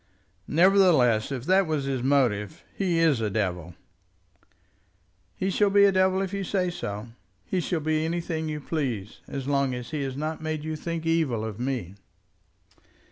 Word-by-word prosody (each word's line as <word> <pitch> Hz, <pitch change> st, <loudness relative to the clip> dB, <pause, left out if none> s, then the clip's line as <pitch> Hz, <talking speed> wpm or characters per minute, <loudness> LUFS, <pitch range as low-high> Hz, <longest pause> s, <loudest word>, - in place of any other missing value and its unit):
"Nevertheless, 160 Hz, -, +4 dB
if 130 Hz, -2 st, -4 dB
that 190 Hz, +1 st, +3 dB
was 155 Hz, -3 st, -1 dB
his 135 Hz, -2 st, -2 dB
motive, 125 Hz, -7 st, +1 dB
he 180 Hz, -4 st, 0 dB
is 160 Hz, -7 st, +3 dB
a 110 Hz, -, 0 dB
devil." 90 Hz, -5 st, -2 dB, 1.6 s
"He 190 Hz, +1 st, -1 dB
shall 205 Hz, +2 st, +3 dB
be 200 Hz, 0 st, +5 dB
a 200 Hz, -, +5 dB
devil 190 Hz, 0 st, +2 dB
if 190 Hz, 0 st, -5 dB
you 200 Hz, 0 st, -2 dB
say 185 Hz, -1 st, 0 dB
so. 105 Hz, -6 st, -5 dB, 0.4 s
He 185 Hz, -, -1 dB
shall 175 Hz, -2 st, -1 dB
be 155 Hz, +1 st, 0 dB
anything 165 Hz, -1 st, -2 dB
you 150 Hz, -1 st, -4 dB
please, 125 Hz, -, -3 dB
so -, -, -4 dB
long 140 Hz, -1 st, 0 dB
as 125 Hz, -1 st, -7 dB
he 155 Hz, -2 st, -2 dB
has 135 Hz, -1 st, -4 dB
not 155 Hz, +2 st, -3 dB
made 155 Hz, -1 st, -3 dB
you 155 Hz, 0 st, -3 dB
think 165 Hz, +1 st, -4 dB
evil 155 Hz, -9 st, +1 dB
of 110 Hz, -1 st, -6 dB
me." 125 Hz, -8 st, -3 dB
155 Hz, 170 wpm, -26 LUFS, 125-170 Hz, 1.6 s, be